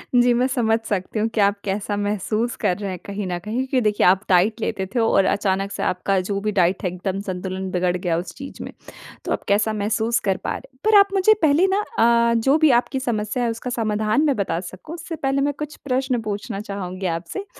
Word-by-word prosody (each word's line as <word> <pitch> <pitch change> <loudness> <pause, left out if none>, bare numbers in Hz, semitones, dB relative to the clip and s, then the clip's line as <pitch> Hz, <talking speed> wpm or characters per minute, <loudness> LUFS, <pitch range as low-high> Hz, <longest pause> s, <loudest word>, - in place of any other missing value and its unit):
जी, 245 0 +5
मैं 250 +2 +2
समझ 230 -4 +1
सकती 200 +2 -2
हूँ 220 - +1
कि - - 0
आप 200 0 +3
कैसा 205 +1 -2
महसूस 210 +3 -1
कर 180 - +2
रहे 200 -2 -4
हैं 180 - -6
कहीं 200 0 -4
न 175 -1 -2
कहीं 210 +4 -6
क्योंकि 260 -2 +1
देखिए 210 -1 +2
आप 190 +2 +4
डाइट 200 +5 +3
लेते 195 -4 -2
थे - - +3
और 210 -4 +3
अचानक 195 0 0
से - - -4
आपका 190 +2 0
जो 200 -1 -1
भी 210 0 -1
डाइट 180 +2 +2
है 185 - +1
एकदम 185 +2 -4
संतुलन 185 +1 -4
बिगड़ 180 0 +1
गया 175 -2 -1
उस 170 -1 -5
चीज़ 275 0 -9
में - - -7 0.5
तो - - -3
आप - - -1
कैसा 210 +2 +2
महसूस 220 +2 0
कर 190 - +2
पा - - -2
रहे - - -15
हैं। 260 - -30
पर 435 -1 +6
आप 400 - +6
मुझे 390 +3 +5
पहले 315 +5 +4
न 410 - +2 0.2
अ, 235 0 +4
जो 270 +6 +3
भी 315 -1 +4
आपकी 265 - -5
समस्या 235 -1 -2
है 235 - +1
उसका 230 +2 -5
समाधान 215 +2 0
मैं 280 -4 +2
बता 175 -4 -1
सकूँ, 185 - -9
उससे 335 -1 -6
पहले 275 -1 0
मैं 290 +1 +1
कुछ 300 0 -5
प्रश्न 255 -2 0
पूछना 205 0 -4
चाहूँगी 195 -2 -5
आपसे 180 - -6
215 Hz, 230 wpm, -22 LUFS, 190-250 Hz, 0.5 s, पर